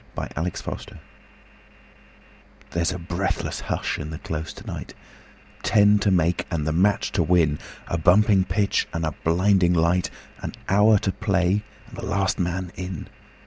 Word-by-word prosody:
Vitaï - - -4
Lampada 85 +3 -5 1.7
There's 85 0 0
a 90 - -4
breathless 90 +2 -2
hush - - -2
in 75 - -5
the 80 - -5
Close 80 0 -5
to - - -12
night - - -7 0.7
Ten 105 0 +5
to 100 - +2
make 90 -2 +1
and 80 -4 -2
the 80 - 0
match 100 +5 +2
to 95 - +1
win 80 -3 +3 0.3
A 85 - -1
bumping 95 +3 +5
pitch 100 +3 0
and 85 -1 -1
a 80 - -2
blinding 90 +1 +3
light, 85 +2 +2 0.3
An - - -5
hour 105 +2 +5
to 95 - -1
play 95 +1 +1 0.2
and - - -13
the - - -5
last 100 0 0
man 90 0 -2
in. 90 -3 -6
90 Hz, 155 wpm, -24 LUFS, 85-100 Hz, 1.7 s, Ten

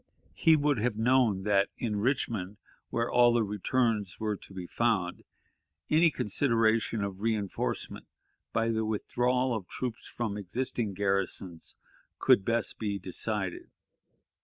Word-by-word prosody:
He 160 -2 +5
would 145 -4 +1
have 115 0 0
known 115 -4 +3
that 100 -1 +3
in 110 -3 -2
Richmond, 105 -4 -1 0.3
where 115 0 0
all 120 -1 +5
the 120 -1 +3
returns 105 -1 0
were 105 -1 -1
to 100 - -12
be 95 -2 -6
found, 95 -4 0 0.7
any 165 +2 +6
consideration 115 -3 +1
of 100 -2 -4
reënforcement, 105 -2 -2 0.4
by 115 0 +1
the 110 -1 0
withdrawal 125 +3 0
of 100 -5 -5
troops 125 -3 -5
from 110 -4 -3
existing 115 +1 -3
garrisons, 95 -3 -2 0.4
could 95 - +4
best 115 -2 0
be 105 -2 -1
decided. 95 0 -3
110 Hz, 130 wpm, -29 LUFS, 100-120 Hz, 0.7 s, any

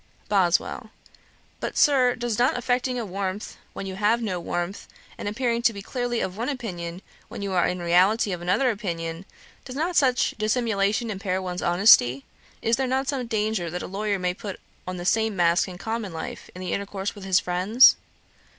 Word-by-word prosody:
BOSWELL. 185 -4 +1 0.7
'But, - - -4
Sir, 255 -4 +4
does 235 -2 -2
not 250 +1 +3
affecting 250 +1 0
a 235 - -3
warmth 195 +1 -4 0.2
when - - -6
you 190 -1 -6
have 215 +3 +2
no 200 -6 -2
warmth, 175 +3 -4 0.3
and - - -6
appearing 235 +2 0
to 235 -1 +3
be 200 -1 -8
clearly 245 -1 -2
of 185 - -3
one 235 +4 -2
opinion 180 -9 -5 0.2
when - - -7
you 200 - -3
are 180 -2 +3
in 180 - -2
reality 195 +6 +3
of 175 -2 -4
another 210 +9 +2
opinion, 170 -4 -4 0.4
does 255 - -8
not 335 +5 -1
such 255 -4 +3
dissimulation 220 0 0
impair 190 -2 -2
one's 180 -1 -4
honesty? 175 - +5 0.4
Is 230 +1 +2
there 265 -1 0
not 265 +2 0
some 260 -4 -2
danger 215 -5 -1
that 180 +2 -4
a - - -5
lawyer 200 +1 -1
may 180 -1 -1
put 200 +1 -7 0.3
on 185 0 -4
the 175 - -6
same 220 +1 +2
mask 175 0 +3
in 180 -1 -8
common 220 0 -4
life, 160 -1 -7
in 180 - -8
the 185 - -3
intercourse 200 0 -3
with 205 - -11
his 190 -1 +3
friends?' 185 +9 +5
200 Hz, 190 wpm, -25 LUFS, 180-235 Hz, 0.7 s, honesty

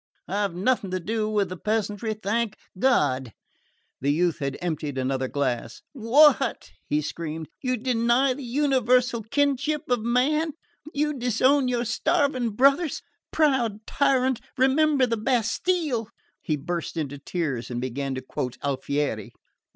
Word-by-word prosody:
I've 200 -2 -1
nothing 200 +1 +1
to 185 0 -2
do 215 +4 -2
with 205 -3 +1
the 185 - -6
peasantry, 215 +1 -1
thank 215 +1 -1 0.2
God!" 135 - +2 0.7
The 140 +2 +1
youth 170 +2 +1
had 140 -1 -3
emptied 155 -5 -3
another 130 0 -1
glass. 125 -4 -2
"What?" 270 +2 +4 0.2
he 150 +1 0
screamed. 160 0 -5
"You 255 -1 0
deny 245 +2 +2
the 280 - -8
universal 250 -2 +2
kinship 285 +5 0
of 245 - +3
man? 275 +8 +1 0.4
You 300 0 0
disown 255 +2 +2
your 245 -1 0
starving 265 -2 +1
brothers? 275 +6 +3 0.3
Proud 240 -8 +1
tyrant, 260 -3 +1 0.2
remember 270 +1 +4
the 230 -2 -1
Bastille!" 245 - 0 0.3
He 155 - -1
burst 170 +3 -4
into 145 -3 -3
tears 140 -6 -3
and 120 -1 -3
began 130 +2 -3
to 130 - -4
quote 125 -1 -4
Alfieri. 140 -5 -2
225 Hz, 135 wpm, -25 LUFS, 160-265 Hz, 0.7 s, What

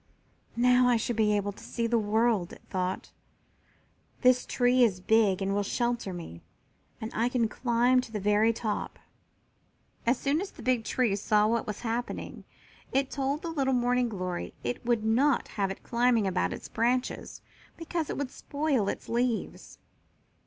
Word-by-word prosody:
"Now 250 +1 +4
I 245 -1 +4
shall 230 +1 -2
be 210 -1 +3
able 205 0 -1
to 200 - -14
see 235 - -3
the 230 0 +2
world," 215 -3 +1
it - - -14
thought. 185 0 -2 1.1
"This 250 -1 +4
tree 250 0 +3
is 200 -6 +2
big 200 -1 +3
and 195 +1 0
will 205 - +1
shelter 235 0 -1
me, 165 - -8 0.6
and 220 - -5
I 235 +2 +1
can 245 -2 +1
climb 245 +2 +2
to 250 -3 -11
the 215 - -3
very 210 +3 +3
top." 220 -2 -3 1.1
As 240 +2 +4
soon 285 +6 0
as 395 - -4
the - - -13
big 250 -3 +1
tree 240 -6 +1
saw 210 +1 +2
what 230 +1 0
was 210 -1 -5
happening 235 +1 -4 0.5
it 270 0 0
told 280 +2 -2
the 335 - -3
little 270 -4 +1
Morning 245 0 +2
glory 185 -4 -4
it 245 - -3
would 235 -2 +1
not 245 +5 +2
have 200 -2 -1
it 195 - -7
climbing 235 -2 +2
about 90 - 0
its - - -7
branches, 245 +3 -1 0.3
because 330 -1 -3
it - - -3
would 280 -3 -3
spoil 280 -8 -1
its - - -5
leaves. 235 -1 -2
235 Hz, 170 wpm, -28 LUFS, 210-250 Hz, 1.1 s, Now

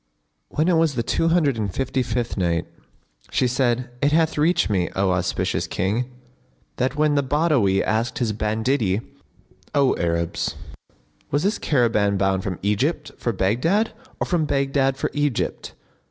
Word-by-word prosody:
When 155 +3 0
it 175 -2 +4
was 160 -4 +2
the 115 - 0
Two 165 - 0
Hundred 160 -7 +2
and 100 -3 -1
Fifty 135 +5 -1
fifth 120 -1 -2
Night, 85 -3 0 0.6
She - - +1
said, 125 0 0
It 145 - +3
hath 160 0 +2
reached 160 +4 +2
me, 95 -4 0
O 95 -1 +2
auspicious 90 0 -1
King, 110 +7 -1 0.7
that 130 +1 0
when 150 0 +2
the 145 - +3
Badawi 135 - +2
asked 115 +3 -1
his 115 -4 0
banditti, 110 -1 0 0.7
"O 140 -2 +4
Arabs, 85 0 -1 0.7
was 145 +2 0
this 205 +3 +1
caravan 110 -7 +2
bound 95 -1 +1
from 95 -3 -4
Egypt 105 +11 0
for 120 - 0
Baghdad 125 - +1 0.3
or - - 0
from 170 -4 +1
Baghdad 135 -1 +1
for - - -2
Egypt?" 145 -4 -2
125 Hz, 155 wpm, -23 LUFS, 100-145 Hz, 0.7 s, it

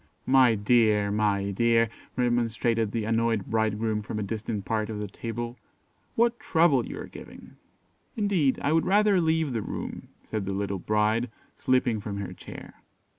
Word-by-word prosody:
"My 130 -3 +5
dear, 105 -1 +3
my 100 -1 +1
dear!" 115 +3 +3 0.3
remonstrated 115 -2 +1
the 115 -1 -2
annoyed 115 -2 +1
bridegroom 110 -1 0
from 105 +1 -5
a 105 - -1
distant 105 0 -4
part 110 -1 -1
of 110 - -4
the 105 0 -4
table; 120 +4 -6 0.6
"what 235 +1 +2
trouble 160 -7 +3
you - - -6
are - - -6
giving." - - -12 0.6
"Indeed, 190 -11 +2
I 145 - +2
would 165 - +2
rather 205 -1 +4
leave 160 -4 +1
the 115 - -1
room," - - -6 0.2
said 105 -3 -4
the 100 - -2
little 100 -1 -2
bride, 110 +5 +1 0.3
slipping 125 -4 +1
from 100 -1 -5
her 95 -3 -5
chair. - - -11
115 Hz, 160 wpm, -27 LUFS, 105-125 Hz, 0.6 s, My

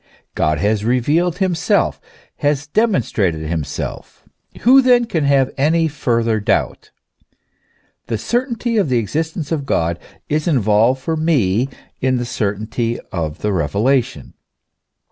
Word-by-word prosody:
God 75 0 +1
has 105 +4 0
revealed 150 +9 +1
himself, 185 -3 +1 0.4
has 145 0 0
demonstrated 115 - 0
himself: 80 -3 -5 0.4
who 265 +3 +7
then 245 -2 +4
can 160 -9 -1
have 135 -2 +3
any 160 +3 +3
further 115 -6 0
doubt? 105 - -1 1.2
The 115 - -1
certainty 235 - -1
of 195 -9 +2
the 125 - +2
existence 155 - -3
of 145 -4 -2
God 85 -7 0 0.3
is 150 +2 -1
involved 115 - +3
for 160 - -1
me 135 - +1 0.3
in 130 0 +1
the 120 - -2
certainty 110 +2 -2
of 80 -2 -4
the 105 -1 0
revelation. 105 - 0
130 Hz, 125 wpm, -18 LUFS, 105-160 Hz, 1.2 s, who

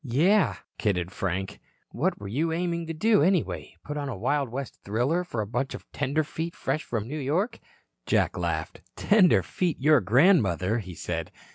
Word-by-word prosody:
"Yes," 160 - +3 0.2
kidded 90 -5 0
Frank, 95 -1 -3 0.3
"what - - -1
were 100 - -7
you 150 +11 0
aiming 170 0 -2
to 165 - -3
do, 215 +2 +3
anyway? 180 +2 0
Put 150 - -5
on 145 -1 -3
a 120 - -4
Wild 135 +5 0
West 135 +2 -6
thriller 125 - 0
for 120 -11 -3
a - - -2
bunch 120 +6 -2
of - - -10
tenderfeet 155 +4 -2
fresh 155 - -2
from 110 -2 -3
New 150 +4 -4
York?" 160 - -1 0.5
Jack - - +2
laughed. - - -3
"Tenderfeet, 185 -4 +3
your 150 0 +5
grandmother," 110 - +3
he 95 -5 -8
said. 80 -1 -4
140 Hz, 165 wpm, -27 LUFS, 110-165 Hz, 0.5 s, your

